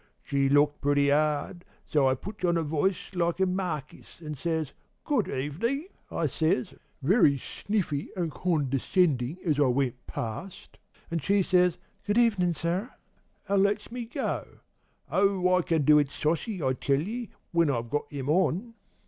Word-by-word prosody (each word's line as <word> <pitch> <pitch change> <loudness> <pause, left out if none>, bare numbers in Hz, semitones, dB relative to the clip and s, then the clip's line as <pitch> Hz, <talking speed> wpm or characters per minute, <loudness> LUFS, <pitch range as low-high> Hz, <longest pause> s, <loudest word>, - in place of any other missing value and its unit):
She 140 -1 +1
looked 145 +1 +3
pretty 145 0 +3
'ard, 155 +4 0 0.2
so 145 -3 +2
I 130 - +2
puts 205 +8 -9
on 170 -1 +3
a 165 - 0
voice 160 +6 -1
like 170 0 0
a 190 - +4
markis, 180 -7 -4
an' 155 -2 -6 0.7
'Good 275 -9 +1
evenin'! 230 - -2 0.2
I - - -1
says, 155 -5 0 0.3
very 155 - +4
sniffy 165 -1 -3
an' 170 -3 -1
condercendin' 145 -1 +1
as 150 -4 +1
I 145 - +5
went 125 -1 -1
past, 120 - -6 0.3
and 165 -1 -1
she 195 +6 +2
says 180 -2 +3 0.3
'Good 205 +2 +1
evenin', 200 -8 +3
sir,' 175 +9 -2 0.6
an' 200 -1 +3
lets 205 +2 0
me 245 -1 -4
go. 230 - -4 0.5
Oh, 190 -2 +3
I 180 - +4
can 160 -3 +1
do 150 +2 +6
it 145 -2 +1
sossy, 165 +6 -2
I 130 -1 +2
tell 135 +2 +1
ye, 220 +7 -4 0.2
when 170 -3 +3
I've 120 -3 -2
got 145 0 -1
'em 140 -2 -5
on! 185 +7 +1
165 Hz, 155 wpm, -28 LUFS, 145-190 Hz, 0.7 s, do